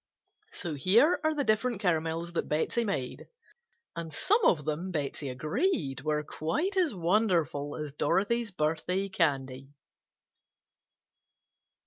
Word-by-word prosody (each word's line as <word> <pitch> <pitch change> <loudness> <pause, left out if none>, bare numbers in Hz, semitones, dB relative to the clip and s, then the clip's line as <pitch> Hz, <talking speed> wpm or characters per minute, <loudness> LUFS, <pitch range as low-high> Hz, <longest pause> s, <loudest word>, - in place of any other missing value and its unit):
So 170 - -3
here 225 - +4
are 315 0 +1
the 290 - 0
different 225 -1 +1
caramels 165 -2 -1
that - - -2
Betsey 160 +10 0
made, 165 - -3 0.7
and 165 -1 -5
some 415 - +2
of 150 -5 +3
them 155 +4 -2
Betsey 145 -3 -3
agreed 140 - -1
were 150 +1 0
quite 170 - -2
as 350 - +2
"wonderful" 170 - +1
as 150 -2 -5
Dorothy's 210 +10 +1
birthday 180 +3 -1
candy. 135 -7 -1
170 Hz, 115 wpm, -29 LUFS, 150-215 Hz, 0.7 s, here